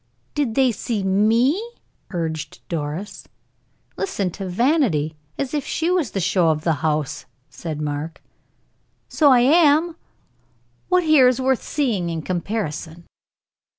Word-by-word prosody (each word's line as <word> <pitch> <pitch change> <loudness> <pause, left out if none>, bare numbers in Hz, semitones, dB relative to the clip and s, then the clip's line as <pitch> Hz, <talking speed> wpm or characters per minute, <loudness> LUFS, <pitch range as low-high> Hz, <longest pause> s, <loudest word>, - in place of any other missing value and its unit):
"Did 275 -7 -1
they 265 -2 +4
see 220 -2 -3
me?" 225 - +2 0.5
urged 160 -4 -5
Doris. 165 +4 -5 0.7
"Listen 200 - -2
to 195 +2 -6
Vanity! 190 - +1 0.2
As 275 0 -3
if 295 -2 -1
she 330 +5 -1
was 350 -9 +1
the 195 - -3
show 180 -2 +2
of 155 -1 0
the 165 - +2
house!" 155 -3 -1 0.2
said 155 -3 -6
Mark. 150 +2 -4 0.9
"So 295 -3 +4
I 250 -2 +6
am. 315 +4 +4 0.9
What 365 -1 +3
here 310 -5 +6
is 250 0 +2
worth 260 -1 +1
seeing 225 - -1
in 165 -2 -4
comparison?" 175 -3 -4
205 Hz, 130 wpm, -22 LUFS, 165-275 Hz, 0.9 s, I